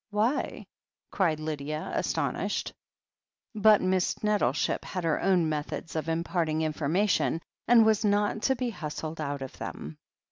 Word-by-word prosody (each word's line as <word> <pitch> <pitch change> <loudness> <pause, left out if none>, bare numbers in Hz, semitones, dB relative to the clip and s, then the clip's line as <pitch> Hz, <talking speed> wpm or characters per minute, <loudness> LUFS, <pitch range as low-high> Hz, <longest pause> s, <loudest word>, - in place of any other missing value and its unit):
"Why?" 215 +6 0 0.5
cried 165 -6 +1
Lydia, 155 0 -4
astonished. - - -1 0.8
But 215 -2 +5
Miss 185 +1 0
Nettleship 200 -11 +1
had 185 - -4
her 165 -2 +1
own 180 -4 +3
methods 155 +2 -4
of 160 0 -2
im 165 +1 0
parting 165 -3 0
information, 160 +4 +1 0.3
and 230 -2 +7
was 220 -1 +3
not 205 +1 +1
to 265 - +3
be 245 -1 -2
hustled 155 -2 -5
out 140 -2 -3
of 130 - -9
them. 75 +1 -7
165 Hz, 140 wpm, -28 LUFS, 155-210 Hz, 0.8 s, and